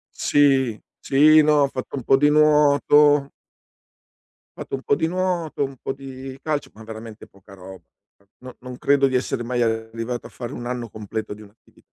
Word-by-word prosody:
Sì, 135 Hz, -6 st, +2 dB, 0.2 s
sì, 155 Hz, +3 st, +5 dB
no, 150 Hz, -1 st, +3 dB
ho 140 Hz, -, +2 dB
fatto 130 Hz, +1 st, -6 dB
un 130 Hz, -, -6 dB
po' 135 Hz, -, +4 dB
di 145 Hz, +2 st, +3 dB
nuoto. 150 Hz, -1 st, +4 dB, 1.3 s
Ho -, -, -11 dB
fatto -, -, -6 dB
un 135 Hz, -, -4 dB
po' -, -, +1 dB
di 160 Hz, -, 0 dB
nuoto, 175 Hz, -4 st, -2 dB
un 135 Hz, 0 st, -7 dB
po' 135 Hz, -, -4 dB
di 135 Hz, -1 st, -10 dB
calcio, 150 Hz, -2 st, -3 dB
ma 110 Hz, -, -13 dB
veramente 110 Hz, 0 st, -10 dB
poca 100 Hz, +1 st, -18 dB
roba. 95 Hz, -1 st, -12 dB, 0.6 s
No 130 Hz, 0 st, -11 dB
non 125 Hz, 0 st, -9 dB
credo 140 Hz, +1 st, +2 dB
di 130 Hz, -, -5 dB
essere 125 Hz, -1 st, -2 dB
mai 120 Hz, +1 st, -2 dB
arrivato 115 Hz, +1 st, -3 dB
a -, -, -13 dB
fare 120 Hz, -2 st, -8 dB
1 120 Hz, -, -7 dB
anno 120 Hz, -1 st, -4 dB
completo 110 Hz, +1 st, -6 dB
di 105 Hz, -, -15 dB
un'attivi 105 Hz, +1 st, -21 dB
130 Hz, 185 wpm, -22 LUFS, 115-145 Hz, 1.3 s, sì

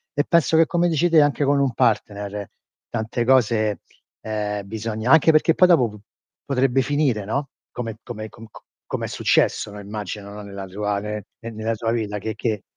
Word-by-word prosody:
e 145 Hz, -, +2 dB
penso 165 Hz, -1 st, +3 dB
che 165 Hz, -, +6 dB
come 175 Hz, +1 st, +1 dB
dici 165 Hz, +2 st, +2 dB
te 160 Hz, -2 st, +6 dB
anche 145 Hz, 0 st, +2 dB
con 140 Hz, 0 st, +3 dB
un 135 Hz, -3 st, +1 dB
partner 105 Hz, -4 st, -1 dB, 0.4 s
tante 110 Hz, +2 st, -2 dB
cose, 115 Hz, -4 st, +2 dB, 0.4 s
ehm, 105 Hz, -2 st, -3 dB
bisogna 110 Hz, +2 st, -2 dB
anche 160 Hz, +1 st, +6 dB
perché 155 Hz, +1 st, +4 dB
poi 180 Hz, -, +5 dB
dopo 130 Hz, -10 st, +4 dB
p 105 Hz, 0 st, -12 dB, 0.4 s
potrebbe 135 Hz, -1 st, +2 dB
finire, 135 Hz, -5 st, 0 dB
no, 140 Hz, +7 st, -2 dB, 0.2 s
come 115 Hz, -3 st, -5 dB
come 110 Hz, -2 st, -7 dB
co 115 Hz, -1 st, -13 dB
co -, -, -15 dB, 0.2 s
come -, -, -3 dB
è -, -, -4 dB
successo, -, -, +1 dB
no, 105 Hz, -, -9 dB
immagino, 100 Hz, 0 st, -6 dB
no, 105 Hz, -, -8 dB
nella 100 Hz, -1 st, -7 dB
tua 100 Hz, +2 st, -2 dB
ne 105 Hz, 0 st, -5 dB
ne 115 Hz, -2 st, -7 dB
nella 110 Hz, +1 st, -2 dB
tua 115 Hz, +1 st, -2 dB
villa 110 Hz, -3 st, -2 dB
che 110 Hz, +2 st, -4 dB
che 110 Hz, -4 st, -2 dB
115 Hz, 195 wpm, -22 LUFS, 105-135 Hz, 0.4 s, che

